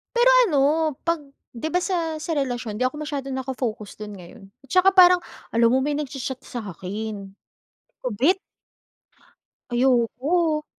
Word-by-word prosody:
Pero 480 Hz, +1 st, +5 dB, 0.2 s
ano 305 Hz, -7 st, +1 dB, 0.5 s
'pag 335 Hz, 0 st, +1 dB, 0.3 s
'di 240 Hz, +6 st, -4 dB
ba 360 Hz, -, +2 dB
sa 335 Hz, -4 st, -1 dB
sa 325 Hz, +1 st, -2 dB
relasyon 245 Hz, -6 st, -2 dB
di 250 Hz, -, 0 dB
ako 255 Hz, -, -1 dB
masyadong 280 Hz, -3 st, -4 dB
naka 265 Hz, 0 st, -3 dB
focus 215 Hz, -5 st, -4 dB
dun 210 Hz, -1 st, -7 dB
ngayon, 195 Hz, +3 st, -13 dB, 0.2 s
at -, -, -24 dB
tsaka 370 Hz, +5 st, +5 dB
parang 360 Hz, -1 st, +7 dB, 0.3 s
alam 230 Hz, 0 st, +4 dB
mo 260 Hz, -, +3 dB
may 290 Hz, +2 st, 0 dB
nagcha-chat 270 Hz, -3 st, -5 dB
sa'kin, 205 Hz, -1 st, -6 dB
'di -, -, -44 dB, 0.5 s
ko 255 Hz, -, -1 dB
bet. 340 Hz, +10 st, +4 dB, 1.3 s
Ayoko, 265 Hz, +6 st, +1 dB
265 Hz, 150 wpm, -23 LUFS, 230-315 Hz, 1.3 s, parang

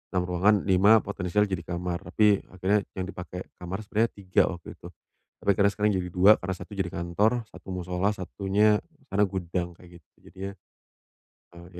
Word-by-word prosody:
6 90 Hz, -, +2 dB
ruangan 90 Hz, +4 st, +3 dB
5 100 Hz, +3 st, +5 dB
potensial 100 Hz, 0 st, 0 dB
jadi 85 Hz, -3 st, -3 dB
kamar 85 Hz, 0 st, -3 dB
tapi 105 Hz, +1 st, +3 dB
akhirnya 95 Hz, +2 st, 0 dB
yang 95 Hz, -1 st, -3 dB
dipakai 90 Hz, -1 st, -7 dB, 0.2 s
kamar 90 Hz, +4 st, -5 dB
sebenarnya 110 Hz, +3 st, +1 dB, 0.2 s
3 95 Hz, -, +3 dB
waktu 85 Hz, -, -11 dB
itu, -, -, -12 dB, 0.6 s
tapi -, -, 0 dB
akhirnya 100 Hz, +1 st, +3 dB
sekarang 105 Hz, 0 st, +1 dB
jadi 90 Hz, -, -3 dB
3 95 Hz, +4 st, +7 dB
karena 95 Hz, 0 st, -3 dB
1 90 Hz, 0 st, -11 dB
jadi 90 Hz, -2 st, 0 dB
kantor 85 Hz, +6 st, +1 dB, 0.2 s
1 -, -, -15 dB
mushola 90 Hz, +2 st, -1 dB
1-nya 100 Hz, +3 st, +2 dB, 0.4 s
sana 105 Hz, +1 st, +4 dB
gudang 90 Hz, -2 st, -3 dB
kayak 90 Hz, -1 st, -15 dB
gitu -, -, -52 dB, 0.2 s
jadinya, 95 Hz, +1 st, -6 dB, 1.1 s
eee, 85 Hz, -, -12 dB
95 Hz, 170 wpm, -27 LUFS, 90-100 Hz, 1.1 s, 3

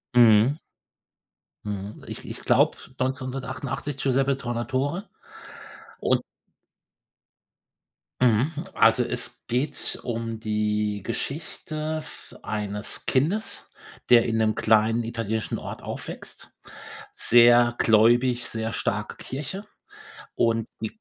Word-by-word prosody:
Mhm. 120 Hz, +3 st, +6 dB, 1.1 s
Mhm, 105 Hz, 0 st, -5 dB
ich -, -, -8 dB
ich -, -, -6 dB
glaube, -, -, +3 dB, 0.2 s
1988 130 Hz, +2 st, -3 dB
Giuseppe 135 Hz, 0 st, +2 dB
Tornatore 130 Hz, -, -2 dB, 1.0 s
und -, -, +2 dB, 2.0 s
Mhm. 125 Hz, +5 st, +3 dB, 0.2 s
Also, 115 Hz, +2 st, +5 dB
es 120 Hz, 0 st, -3 dB
geht 125 Hz, +5 st, -1 dB
um 115 Hz, -2 st, -3 dB
die 105 Hz, -1 st, -1 dB
Geschichte 155 Hz, -, -4 dB
v -, -, -13 dB
eines 105 Hz, -1 st, -4 dB
Kindes, 175 Hz, +11 st, 0 dB, 0.4 s
der 120 Hz, -1 st, +8 dB
in 115 Hz, -1 st, 0 dB
'nem 110 Hz, -1 st, +2 dB
kleinen 110 Hz, +2 st, +3 dB
italienischen 110 Hz, -1 st, -2 dB
Ort -, -, -7 dB
aufwächst, -, -, -7 dB, 0.6 s
sehr 120 Hz, 0 st, +6 dB
gläubig, 120 Hz, +3 st, +4 dB
sehr 110 Hz, 0 st, -3 dB
starke 105 Hz, -2 st, -2 dB
Kirche. 150 Hz, +10 st, -5 dB, 0.7 s
Und 115 Hz, -1 st, +1 dB
i 110 Hz, -, -1 dB
120 Hz, 95 wpm, -25 LUFS, 110-135 Hz, 2.0 s, der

